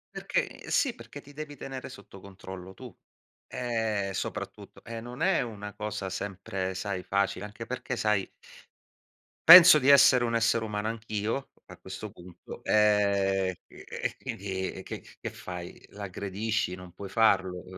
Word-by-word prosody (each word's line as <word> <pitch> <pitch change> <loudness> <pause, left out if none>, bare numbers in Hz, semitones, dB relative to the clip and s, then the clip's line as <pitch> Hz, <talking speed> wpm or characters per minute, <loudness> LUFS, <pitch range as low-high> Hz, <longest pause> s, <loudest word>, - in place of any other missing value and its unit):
Perché - - -2
sì, 265 -5 +2
perché 145 - -11
ti 145 0 -16
devi 145 0 -7
tenere 135 -2 -7
sotto 100 -1 -13
controllo 95 -1 -10
tu. - - -11 0.6
Eh 110 -5 -1
soprattutto - - -6
e 115 -1 -6
non 120 +5 -9
è 190 +3 +3
una 105 -4 -6
cosa 105 -2 -4
sempre 95 -1 -4
sai 95 -1 -3
facile, 100 +1 0
anche 105 +2 -8
perché 125 0 -4
sai 105 -4 +1 1.2
penso 175 -3 +12
di 130 - -1
essere 130 -3 +7
un 115 0 -1
essere 115 0 +2
umano 105 0 -2
anch'io 110 +2 -3 0.2
a - - -12
questo 95 +3 -8
punto, 90 -3 -12
ehm, 100 -3 +3
chi - - -20
e - - -5
quindi 95 -1 -4
e 95 - -9
che - - -6 0.2
che - - -3
fai? 90 -1 -8
L'aggredisci? 100 0 -3
Non 90 -1 -12
puoi 100 +3 -8
farlo. 95 -4 +2
105 Hz, 150 wpm, -28 LUFS, 95-115 Hz, 1.2 s, penso